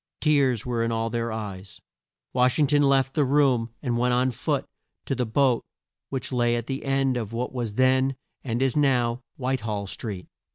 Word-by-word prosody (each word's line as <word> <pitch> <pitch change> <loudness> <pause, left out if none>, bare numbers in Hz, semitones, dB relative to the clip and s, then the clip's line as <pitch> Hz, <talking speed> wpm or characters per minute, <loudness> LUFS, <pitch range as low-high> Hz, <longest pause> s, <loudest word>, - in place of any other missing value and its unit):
Tears 140 -6 +2
were 120 -2 -1
in 115 0 0
all 115 0 -1
their 115 0 -2
eyes. 100 -4 -7 0.5
Wash 125 0 +3
ing 150 - +4
ton 145 +1 +3
left 135 -1 +3
the 150 - +2
room, 135 -4 +2
and 120 -3 0
went 125 0 +2
on 130 +1 +2
foot 120 - -1 0.4
to - - -1
the 125 -2 -1
boat 125 +1 +2 0.5
which 135 0 -4
lay 120 -1 +2
at 120 -1 -2
the 135 +2 -4
end 135 -2 +1
of 115 -2 -4
what 125 +2 -3
was 120 -5 -3
then 130 +1 +3 0.3
and 120 0 -1
is 135 -2 +1
now 125 -4 +2 0.2
White 130 -1 -1
hall 105 -2 -3
Street. 100 -2 -6
125 Hz, 195 wpm, -25 LUFS, 115-135 Hz, 0.5 s, ing